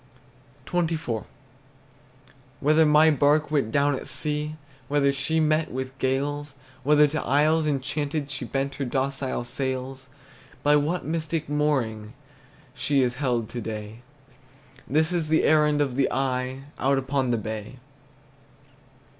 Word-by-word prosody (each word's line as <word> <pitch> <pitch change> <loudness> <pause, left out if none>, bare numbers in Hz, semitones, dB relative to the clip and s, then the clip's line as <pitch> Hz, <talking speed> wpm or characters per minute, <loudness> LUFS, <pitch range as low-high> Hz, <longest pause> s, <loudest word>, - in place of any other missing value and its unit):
XXIV. 160 -10 -1 1.3
Whether 155 +2 +4
my 150 +1 +6
bark 150 +1 +2
went 140 -7 +1
down 145 +2 +2
at 130 - -5
sea, 150 0 -1 0.3
Whether 140 -1 +2
she 140 +4 0
met 155 0 +1
with 130 +1 -5
gales, 145 +2 -1 0.3
Whether 150 +2 +5
to 155 0 -2
isles 155 +4 +2
enchanted 145 +1 -2
She 145 - -4
bent 135 +3 -2
her - - 0
docile 135 0 -2
sails; 130 +1 -4 0.5
By 145 0 +5
what 150 +5 0
mystic 160 0 -2
mooring 130 -8 -1 0.6
She 140 -2 +1
is 125 0 -1
held 120 -5 0
to 120 - -5
day, 110 +1 -6 0.9
This 155 +4 +2
is 170 -3 0
the 160 +1 +3
errand 150 -1 +4
of 135 -4 0
the 135 0 +1
eye 130 0 -2 0.2
Out 135 +1 +2
upon 135 -1 0
the 120 - +2
bay. 110 +2 -5
140 Hz, 130 wpm, -25 LUFS, 130-150 Hz, 1.3 s, my